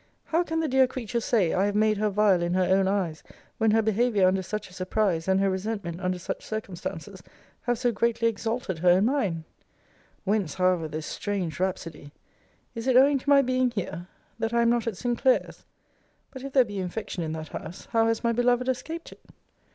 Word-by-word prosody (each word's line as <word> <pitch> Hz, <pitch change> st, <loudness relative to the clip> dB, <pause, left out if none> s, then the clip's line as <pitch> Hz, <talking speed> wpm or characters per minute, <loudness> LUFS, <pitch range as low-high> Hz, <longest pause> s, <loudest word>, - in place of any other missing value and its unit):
How 330 Hz, +2 st, +1 dB
can 325 Hz, -2 st, -1 dB
the 320 Hz, -, 0 dB
dear 265 Hz, -1 st, +4 dB
creature 240 Hz, -2 st, -3 dB
say, 220 Hz, -7 st, +1 dB
I 190 Hz, -, +2 dB
have 205 Hz, -, -2 dB
made 215 Hz, 0 st, +3 dB
her 215 Hz, 0 st, +2 dB
vile 200 Hz, -3 st, +3 dB
in 175 Hz, +1 st, 0 dB
her 185 Hz, -, +3 dB
own 190 Hz, +1 st, +3 dB
eyes, 185 Hz, -6 st, -1 dB, 0.4 s
when 225 Hz, -1 st, +3 dB
her 220 Hz, +1 st, +3 dB
behaviour 220 Hz, -2 st, +2 dB
under 190 Hz, +1 st, +2 dB
such 210 Hz, +2 st, -5 dB
a 180 Hz, -, -17 dB
surprise, 185 Hz, -2 st, -1 dB
and 190 Hz, 0 st, +3 dB
her 195 Hz, -, +2 dB
resentment 190 Hz, -2 st, -3 dB
under 180 Hz, -1 st, -1 dB
such 180 Hz, -, -5 dB
circumstances, 190 Hz, -3 st, -6 dB, 0.5 s
have 245 Hz, -1 st, +2 dB
so 245 Hz, +1 st, +1 dB
greatly 230 Hz, +1 st, +1 dB
exalted 225 Hz, -4 st, -2 dB
her 180 Hz, +2 st, +4 dB
in 195 Hz, -, +2 dB
mine? 205 Hz, -, 0 dB, 0.8 s
Whence, 200 Hz, -5 st, 0 dB
however, 180 Hz, -3 st, +2 dB
this 155 Hz, 0 st, -5 dB
strange 190 Hz, -5 st, -3 dB
rhapsody? 170 Hz, -5 st, -3 dB, 0.6 s
Is 230 Hz, +2 st, -5 dB
it 255 Hz, -1 st, +5 dB
owing 275 Hz, +1 st, +5 dB
to 285 Hz, -, -5 dB
my 280 Hz, -1 st, +6 dB
being 255 Hz, 0 st, +1 dB
here? 180 Hz, -6 st, -5 dB, 0.3 s
That 225 Hz, +1 st, -1 dB
I 235 Hz, -, +4 dB
am 235 Hz, -, +4 dB
not 240 Hz, -1 st, 0 dB
at 215 Hz, -5 st, -2 dB
Sinclair's? 245 Hz, +3 st, 0 dB, 0.7 s
But 260 Hz, -, -9 dB
if 275 Hz, -, -6 dB
there 260 Hz, -3 st, +5 dB
be 205 Hz, -3 st, -5 dB
infection 185 Hz, 0 st, -4 dB
in 160 Hz, -1 st, -3 dB
that 155 Hz, 0 st, -6 dB
house, 175 Hz, -, -8 dB
how 225 Hz, 0 st, +3 dB
has 225 Hz, +1 st, 0 dB
my 235 Hz, -, +2 dB
beloved 245 Hz, +1 st, +2 dB
escaped 320 Hz, +6 st, -4 dB
it? -, -, -15 dB
210 Hz, 205 wpm, -26 LUFS, 185-240 Hz, 0.8 s, my